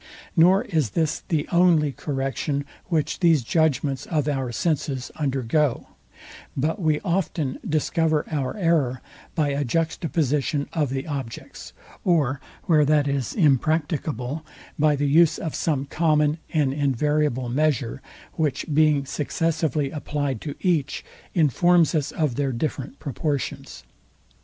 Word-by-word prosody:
Nor 185 +5 +5
is 160 - 0
this 160 -2 +1
the 155 -3 0
only 170 -4 +4
correction, 140 +1 -2 0.2
which 160 -4 -1
these 165 -7 +4
judgments 145 -1 0
of 150 -4 0
our 135 -4 -1
senses 135 -2 -1
undergo; 135 -1 0 0.7
but 160 +9 0
we 155 -2 +2
often 170 -7 -1
discover 155 0 +1
our 140 +2 -2
error 160 -9 +1 0.4
by 155 -4 +1
a 140 +1 0
juxtaposition 150 -1 0
of 150 -4 0
the 135 0 -3
objects; 135 -7 -6 0.3
or 145 -7 +2 0.2
where 155 -3 +4
that 145 0 +3
is 140 -4 -2
impracticable, 150 - +1 0.4
by 150 0 +4
the 145 +1 -1
use 160 +3 +5
of 160 - -4
some 140 -4 -1
common 150 0 +1
and 145 -4 +1
invariable 145 -1 0
measure, 135 -1 0 0.3
which 150 -4 -1
being 150 -2 +3
successively 150 0 -1
applied 145 -5 -3
to 145 -2 -5
each, 155 -7 0 0.3
informs 170 +2 +4
us 150 -4 0
of 150 -7 -1
their 140 -2 0
different 135 +1 -3
proportions. 140 0 -4
150 Hz, 125 wpm, -24 LUFS, 135-160 Hz, 0.7 s, Nor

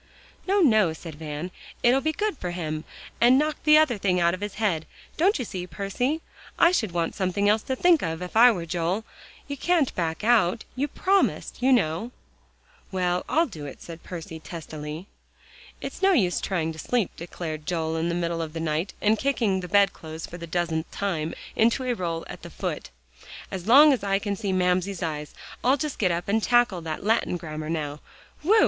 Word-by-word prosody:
"No, 395 +1 +3
no," 215 - +4
said 160 0 -9
Van; 150 +3 -6 0.3
"it'll 250 +3 +5
be 315 - +1
good 420 +4 -1
for 180 -9 -5
him, 155 -3 -4 0.4
and 245 +2 +7
knock 305 +2 +1
the 305 0 +8
other 265 -9 +3
thing 185 -2 +2
out 170 0 +3
of 185 - -5
his 205 -1 -4
head, 180 -8 0 0.3
don't 380 +6 +3
you 250 - -3
see, 180 -3 -5
Percy? 245 - -2 0.4
I 335 - +6
should 225 - 0
want 170 -1 -1
something 200 +1 0
else 210 +1 +4
to 260 - -3
think 340 +3 +4
of 160 -1 -2
if 180 - -8
I 240 +3 +9
were 180 -8 -1
Joel. 175 +6 -1 0.4
You 285 - -5
can't 330 -2 +2
back 165 +1 -2
out; 220 -3 +3
you 275 +3 0
promised, 385 +1 0
you 260 +2 +4
know." 200 -2 +2 0.8
"Well, 180 -2 +1
and - - -1
I'll 330 - +5
do 155 - -8
it," 135 - -9
said 165 -1 -10
Percy 165 -2 -7
testily. 155 0 -7 0.8
"It's - - -6
no 390 0 +5
use 185 - +2
trying 165 -4 -1
to 160 - -11
sleep," 235 -2 0
declared 160 -2 -6
Joel, 160 -2 -1
in 165 +1 0
the 170 - -1
middle 170 -1 -1
of 160 -1 -5
the 165 - -4
night, 160 +3 -2
and 215 +1 +3
kicking 230 -8 +1
the 180 - -6
bed 200 +1 +4
clothes 160 0 -8
for 175 - -9
the 170 - -7
dozenth 165 -1 -1
time 165 -6 -2 0.2
into 235 +4 +3
a 250 -1 0
roll 170 -6 -3
at - - -9
the - - -9
foot, - - -4 0.6
"as 185 0 -5
long 285 +5 +8
as 250 - -2
I 195 -1 +2
can 200 0 -2
see 200 -1 -2
Mamsie's 185 +1 +1
eyes. 150 -2 -4 0.3
I'll 260 +3 +4
just 295 0 -4
get 190 - +3
up 170 0 -2
and 220 +2 +2
tackle 240 -6 +3
that 160 +1 -5
Latin 220 -4 +1
grammar 155 -2 -6
now. 150 -2 -3 0.4
Whew! 415 +9 +5
185 Hz, 205 wpm, -25 LUFS, 165-240 Hz, 0.8 s, I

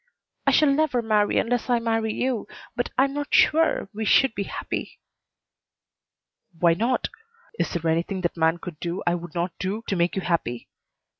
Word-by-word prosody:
"I - - +6
shall 300 -2 +5
never 275 -4 +1
marry 210 -2 +2
unless 245 +1 0
I 245 - +4
marry 225 -1 0
you 250 -1 -2 0.3
but 245 0 -1
I 260 - +6
am 275 0 -1
not 290 0 -4
sure 320 -8 +4
we 220 +2 -4
should 265 +3 +4
be 200 - -3
happy." - - -5 1.6
"Why 170 0 +4
not? 235 +8 0 0.5
Is - - 0
there 165 -1 -2
anything 170 +4 0
that 175 - -1
man 165 0 +2
could 170 -3 -9
do 175 +1 -3
I 175 - +2
would 175 -2 -6
not 175 +1 -1
do 200 +5 -3
to 195 - -1
make 175 0 +1
you 190 - -2
happy? 120 -9 -2
205 Hz, 180 wpm, -24 LUFS, 170-245 Hz, 1.6 s, I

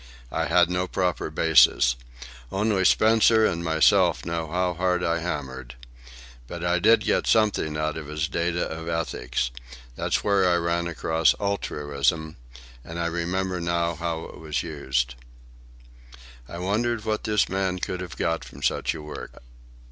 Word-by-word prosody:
I 80 - -1
had 85 +1 +4
no 90 +1 -1
proper 90 -4 -1
basis. 75 -6 +4 0.6
Only 100 -1 +1
Spencer 110 +3 +5
and 85 -3 -1
myself 80 -1 +3
know 85 -1 -3
how 90 +2 0
hard 90 0 0
I 85 0 +1
hammered. 65 -7 -5 0.7
But 85 +4 -7
I 90 0 +2
did 110 +4 +5
get - - 0
something 105 -8 +2
out 75 0 -2
of 75 -2 -7
his 75 +1 -2
Data 85 +1 -1
of 80 +1 -7
Ethics. 65 -7 -2 0.4
There's - - -1
where 100 -3 +3
I 90 - +3
ran 85 0 0
across 80 -1 +1
'altruism,' 80 -6 -1 0.5
and 85 +5 -7
I 85 - -1
remember 90 +2 -2
now 85 0 0
how 85 0 -3
it - - -11
was 75 -2 -3
used." 65 -6 -2 1.4
I 85 - -7
wondered 110 +5 -1
what 110 -1 -1
this 105 -3 +2
man 95 -1 -1
could 90 0 -4
have 90 -4 -8
got 85 0 -1
from - - -12
such - - 0
a 75 - -8
work. 75 -4 -9
85 Hz, 155 wpm, -25 LUFS, 80-90 Hz, 1.4 s, Spencer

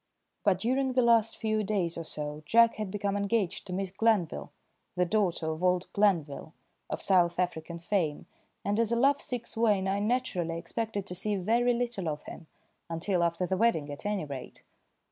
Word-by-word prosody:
But 200 -4 +3
during 260 +6 0
the 255 0 +3
last 230 -2 +3
few 215 -1 0
days 190 -5 -1
or 165 - -4
so 150 -1 -5
Jack 230 0 +5
had 215 -2 -3
become 200 0 -2
engaged 200 -1 -1
to 180 - -5
Miss 190 0 -2
Glanville, 190 - +1 0.4
the 180 - +2
daughter 175 -5 0
of 160 +3 -5
old 180 0 +1
Glanville, 165 -7 +1 0.4
of - - -3
South 175 -3 +3
African 170 -2 -2
fame, 170 -4 -1 0.4
and 205 +2 +1
as 230 -1 +2
a - - +3
love 275 +4 +3
sick 245 -2 -3
swain 210 -5 +1
I 195 +1 0
naturally 205 -7 -1
expected 215 +2 -3
to 180 - -5
see 205 +3 -1
very 235 +6 +2
little 235 -8 -2
of 150 -1 -4
him, 165 - -10 0.4
until 175 +2 0
after 170 +1 0
the 190 +1 -1
wedding 180 -10 +2
at 145 - -8
any 205 -5 -1
rate. 135 -3 -8
195 Hz, 185 wpm, -29 LUFS, 170-225 Hz, 0.4 s, Jack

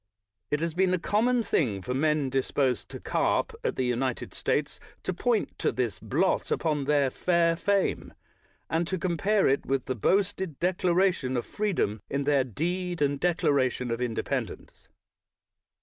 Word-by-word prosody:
It 150 +1 0
has 165 -1 -1
been 185 +1 +2
a - - -1
common 230 +7 +1
thing 110 - 0
for 125 - -3
men 150 0 +1
disposed 135 -2 0
to - - -8
carp - - 0
at - - -1
the 130 - 0
United 125 0 -2
States - - -1 0.2
to 185 - -2
point 230 +4 0
to - - +1
this 120 -6 -2
blot - - 0
upon 150 -4 0
their 140 -2 +2
fair 170 +1 +2
fame, 195 +3 0 0.5
and 165 +1 0
to 185 - -1
compare 190 +4 +1
it 135 +1 +2
with 135 -1 -1
the 130 - -1
boasted 190 - 0
declaration 180 -6 +1
of 120 - -2
free 210 -1 -2
dom 105 - -1
in 140 +1 -1
their 140 -1 +3
Deed 175 - -3
and 140 -1 +1
Declaration 135 -7 +1
of 115 +1 -2
Inde 120 -2 -1
pendence. - - -5
150 Hz, 165 wpm, -27 LUFS, 130-185 Hz, 0.5 s, their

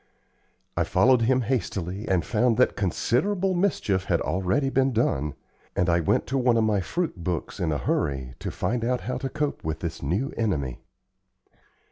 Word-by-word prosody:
I - - +2
followed 125 -1 +4
him 130 +3 +3
hastily, 100 -5 -2
and 90 -4 +1
found 120 0 +2
that 125 - +3
considerable 185 - +1
mischief 140 - +1
had 85 -3 +1
already 95 +9 0
been 135 -1 +2
done, 75 - 0 0.4
and 90 -1 +2
I 85 - +3
went 80 - +1
to 135 +1 -1
one 125 -2 +3
of 115 - +3
my 105 -3 +2
fruit 155 - -3
books 85 -2 -3
in 80 -3 0
a 75 - 0
hurry 65 -3 -1
to - - -4
find 120 -1 -2
out 125 +1 0
how 125 - -3
to 135 - -3
cope 150 -1 -2
with 80 0 -3
this 85 -1 -4
new 95 - -1
enemy. 75 - -1
110 Hz, 175 wpm, -26 LUFS, 85-130 Hz, 0.4 s, followed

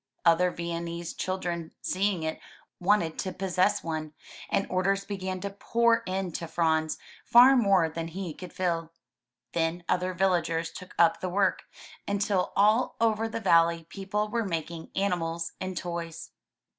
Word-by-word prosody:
Other 170 +2 +5
Viennese 170 0 -4
child 185 0 -3
ren, 170 -2 -3
seeing 190 -2 0
it, 160 0 -3 0.4
wanted 180 -3 +2
to 190 - -2
possess 185 -1 +1
one, 155 -2 -4 0.4
and 195 - +1
orders 195 +2 0
began 190 -2 -4
to 200 +1 -3
pour 230 +3 +2
in 185 -1 -2
to 165 +1 -5
Franz, 160 -1 +1 0.3
far 250 +3 +7
more 195 -8 +4
than 165 +1 -5
he 175 0 -5
could 180 +2 -9
fill. 165 -3 -2 0.6
Then 165 +1 0
other 180 0 0
villagers 170 -3 +1
took 185 - -11
up 170 -1 +4
the 185 - -3
work, 190 +1 +1 0.4
until 200 -2 0
all 215 +5 +3
over 225 0 +2
the 225 - -3
valley 165 -4 +4
people 210 +2 -2
were 230 +2 -1
making 165 -3 -4
animals 170 -4 -1
and 185 -1 -4
toys. 170 -2 -5
180 Hz, 150 wpm, -28 LUFS, 165-195 Hz, 0.6 s, far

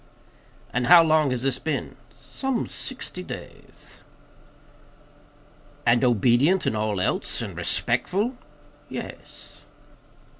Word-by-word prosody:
"And 125 -1 0
how 175 -1 +9
long 155 -2 +3
has 125 -1 -2
this 135 -1 0
been?" 160 - -3
"Some 265 -3 -3
sixty 255 -8 -6
days." - - -9 1.9
"And 120 +2 +4
obedient 125 - +3
in - - +1
all 105 -2 -1
else? 90 - -1
And - - -6
respectful?" 210 +8 0 0.5
"Yes." - - -9
140 Hz, 100 wpm, -25 LUFS, 120-180 Hz, 1.9 s, how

